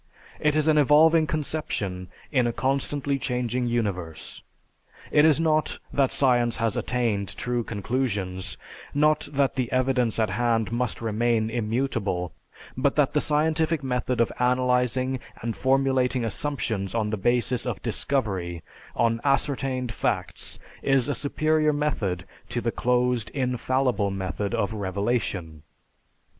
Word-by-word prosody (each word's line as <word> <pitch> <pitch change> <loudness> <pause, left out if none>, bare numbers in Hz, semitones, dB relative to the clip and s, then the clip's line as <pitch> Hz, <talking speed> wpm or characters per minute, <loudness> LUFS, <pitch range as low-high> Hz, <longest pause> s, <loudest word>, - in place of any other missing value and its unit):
It 150 0 +2
is 155 0 +2
an 155 -1 +5
evolving 155 +3 +5
conception 130 - -2 0.2
in 125 -4 +3
a - - +1
constantly 135 +3 -1
changing 125 -1 -1
universe. 90 -9 -3 0.7
It 150 - +5
is 155 -1 +4
not 155 -1 +1 0.2
that 135 -2 +2
science 120 -3 +3
has 115 -1 0
attained 115 -6 -1
true 120 -1 -1
conclusions; 100 -5 -2 0.4
not 150 +1 +2
that 140 -1 +1
the 130 -3 -2
evidence 130 -3 +1
at 110 -4 +1
hand 115 0 +1
must 120 +1 -2
remain 115 0 +1
immutable; 110 -6 -1 0.4
but 135 +2 +1
that 150 -1 +2
the 150 - +2
scientific 160 0 +1
method 125 -2 -1
of 115 - +2
analyzing 125 +1 +1 0.2
and 115 -1 -2
formulating 130 -2 +2
assumptions 110 -3 -2
on 110 -2 0
the - - 0
basis 120 +3 +1
of - - -4
discovery, 95 - -1 0.3
on 115 0 +1
ascertained 135 -3 0
facts, - - -2 0.2
is 135 -2 +2
a - - +1
superior 155 +2 +1
method 105 - -1 0.2
to - - -1
the - - -1
closed 125 -2 +1
"infallible" 125 -4 0
method 95 +1 -3
of 100 +2 -1
"revelation." 95 -5 -2
125 Hz, 130 wpm, -25 LUFS, 110-135 Hz, 0.7 s, an